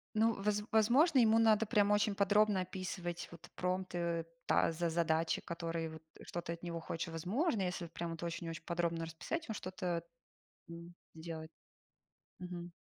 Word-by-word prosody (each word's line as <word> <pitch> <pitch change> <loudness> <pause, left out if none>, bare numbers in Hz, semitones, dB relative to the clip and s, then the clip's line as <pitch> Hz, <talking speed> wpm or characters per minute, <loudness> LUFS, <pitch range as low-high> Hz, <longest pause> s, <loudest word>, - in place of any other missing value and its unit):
Ну, 225 +1 +4
воз 210 0 +1
возможно, 255 +8 +5
ему 225 -1 +6
надо 225 -1 +5
прямо 210 -2 +3
очень 205 0 +2
подробно 205 0 +4
описывать 180 -1 -4
вот 170 -1 -12
промпты, 175 -2 -1 0.2
да, - - +4
за 170 +1 -1
задачи, 160 0 +1
которые 165 -1 -3
вот 160 0 -9 0.2
что 175 - -4
ты 170 - -4
от 170 - -10
него 170 -1 -4
хочешь. 165 +2 -3
Возможно, 200 - 0
если 180 -1 -2
вот 165 - -13
прям 170 0 -3
это 165 +1 -5
очень-очень 165 -1 -4
подробно 170 -1 0
расписать, 175 - -4
он 220 - -2
что-то, 180 -3 -3 0.7
м, 170 +1 -9 0.2
сделает. 160 -1 -7 0.9
Мгм. 175 -1 -6
175 Hz, 160 wpm, -35 LUFS, 165-205 Hz, 0.9 s, ему